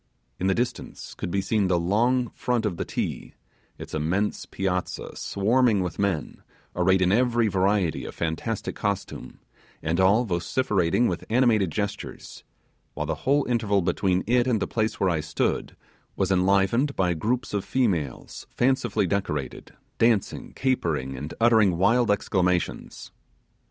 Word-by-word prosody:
In 95 - 0
the 95 - +2
distance 120 0 -4
could - - -5
be 100 +2 0
seen 100 0 +1
the 90 -1 +2
long 120 +8 +1
front 120 -3 -1
of 95 -5 -2
the - - -3
Ti, - - -4 0.4
its - - -9
immense 85 +7 -1
piazza 90 -1 -3
swarming 110 +1 +2
with 90 - -5
men, 100 -6 -2 0.3
arrayed 95 +1 +3
in 90 - +2
every 120 +1 +3
variety 95 -3 +1
of - - -8
fantastic 85 +7 -3
costume, 100 -2 -4 0.5
and 80 +3 0
all 100 +6 +4
vociferating 95 +2 +1
with 90 - -3
animated 110 -5 +3
gestures; 100 +5 -5 0.5
while - - -2
the - - -1 0.2
whole 145 0 +3
interval 110 -5 +1
between 95 +1 +1
it 120 +2 +2
and 120 -4 +2
the - - 0
place 110 -1 -2
where 95 -2 +2
I 80 - 0
stood 75 0 -2 0.4
was 95 -1 0
enlivened 100 +9 +2
by 90 -2 +1
groups 115 +10 -2
of 100 -2 -1
females 90 - -2
fancifully 120 -5 +1
decorated, 85 -7 -3 0.2
dancing, 115 -4 +1
capering, 80 - -1
and 75 +4 -6
uttering 110 -6 +4
wild 115 +5 +3
exclamations. 90 -3 -1
100 Hz, 145 wpm, -25 LUFS, 90-115 Hz, 0.5 s, all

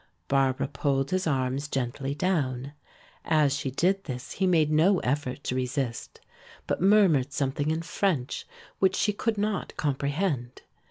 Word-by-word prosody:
Barbara 135 -1 +2
pulled 135 +1 -1
his 185 -1 0
arms 135 0 0
gently 135 +1 -2
down. 145 -6 -1 0.5
As 150 -4 +3
she 140 -1 -2
did 190 +8 +1
this 125 -4 -6
he 190 - 0
made 160 -4 +3
no 170 +6 +4
effort 140 +1 -2
to - - -2
resist, 130 -2 -3 0.5
but - - -2
murmured 185 -9 +4
something 140 +1 -1
in 160 +1 -1
French 165 -7 -1 0.3
which 190 -1 +3
she 210 - +1
could 220 +1 -1
not 205 -1 -2
comprehend. 140 -2 -1
145 Hz, 145 wpm, -27 LUFS, 135-180 Hz, 0.5 s, no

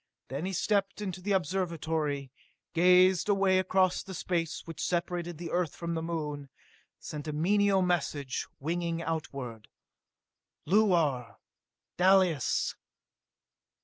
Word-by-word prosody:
Then 140 +8 -3
he 195 - -3
stepped 195 +2 0
into 190 -3 -4
the 200 +2 0
Observatory, 160 -7 -1 0.4
gazed 180 +2 +5
away 195 -2 +4
across 185 0 +2
the 190 -1 -8
space 165 -2 -2
which 165 -2 -6
separated 175 -1 -2
the 170 0 -6
Earth 175 -3 0
from 170 -1 -4
the 165 - -2
Moon, 150 -4 -4 0.5
sent 150 0 -7
a - - -1
mental 195 +4 +3
message 150 -7 -1
winging 170 +2 -2
outward. 135 -9 -5 1.0
"Luar! 170 - +2 0.6
Dalis!" 180 -5 +3
170 Hz, 115 wpm, -30 LUFS, 155-185 Hz, 1.0 s, gazed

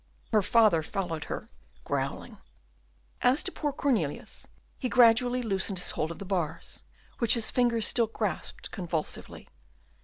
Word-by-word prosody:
Her 215 -2 +4
father 205 -4 +4
followed 165 -2 -4
her, - - -5 0.4
growling. - - -3 0.8
As 255 +6 +3
to 370 - -2
poor 295 -5 -2
Cornelius, 235 - -2 0.3
he 255 - -2
gradually 245 +1 +4
loosened 195 -3 -1
his 180 - +1
hold 155 - -2
of 170 - -7
the 200 - -8
bars, 170 -4 -3 0.4
which 235 -1 +5
his 230 -2 +1
fingers 235 -3 +3
still 235 -2 +3
grasped 210 -6 -4
convulsively. 170 -4 -4
215 Hz, 140 wpm, -28 LUFS, 175-245 Hz, 0.8 s, which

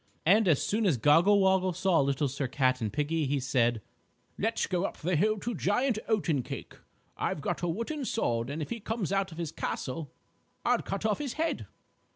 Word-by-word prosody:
And 205 +5 +5
as 155 -6 +3
soon 215 0 +1
as 155 -8 +3
Goggle 165 - +5
Woggle 190 -1 +3
saw 185 0 +2
Little 140 +1 +1
Sir 135 +1 -3
Cat 130 -1 +1
and 110 -2 -1
Piggie, 150 +1 0
he 140 +1 0
said: 120 -4 +1 0.5
"Let's 225 +3 0
go 180 -1 -1
up - - -3
the 175 +3 -1
hill 215 +7 +2
to 235 +4 -3
Giant 220 +5 +1
Oatencake. 170 - -1 0.4
I've - - -2
got 140 - -2
a 175 - 0
wooden 230 - -3
sword 120 - -1
and 155 +2 -3
if - - -9
he 235 - -3
comes 220 -3 -3
out 195 -1 0
of 160 - -10
his 170 -3 -3
castle, 145 +2 -4 0.5
I'll - - +3
cut 195 +2 -4
off 215 -2 +1
his 285 -4 -3
head!" 325 +1 -2
175 Hz, 195 wpm, -29 LUFS, 140-210 Hz, 0.5 s, And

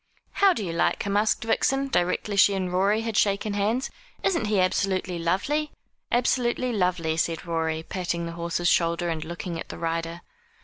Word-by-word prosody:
"How 395 -1 +4
do 220 - -2
you 170 - -3
like 170 - +1
him?" 200 0 -2
asked 210 +2 +2
Vixen, 270 +4 +1
directly 200 -2 0
she 200 0 +5
and 185 -2 -2
Rorie 200 +4 +2
had 225 -1 -3
shaken 200 0 +1
hands. 215 +6 0 0.3
"Isn't 340 - +1
he 210 -2 +1
absolutely 185 -1 0
lovely?' 240 - 0 0.4
"Absolutely 245 0 +1
lovely," 180 -5 0
said 165 +1 -1
Rorie, 160 -1 -1
patting 175 -1 -3
the 170 - -5
horse's 170 +1 -2
shoulder 170 0 +2
and 160 -2 -2
looking 170 +1 -5
at - - -7
the - - -7
rider. 165 +1 -3
185 Hz, 175 wpm, -25 LUFS, 170-215 Hz, 0.4 s, she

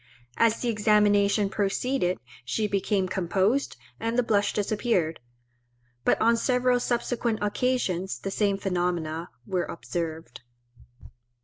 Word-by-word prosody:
As 230 -1 +3
the 245 - -1
examination 210 -1 +3
proceeded 200 0 0 0.3
she 210 - -1
became 195 -1 0
composed, 190 +8 0 0.2
and 230 +1 -1
the 250 - +4
blush 205 -3 +2
disappeared; 205 -6 0 0.8
but - - +3
on 230 +1 +4
several 250 0 +2
subsequent 240 -1 -1
occasions 205 -5 0
the 195 - -5
same 200 -1 +1
phenomena 175 -3 -2 0.2
were 185 -2 -1
observed. 165 -4 -5
205 Hz, 110 wpm, -26 LUFS, 185-230 Hz, 0.8 s, the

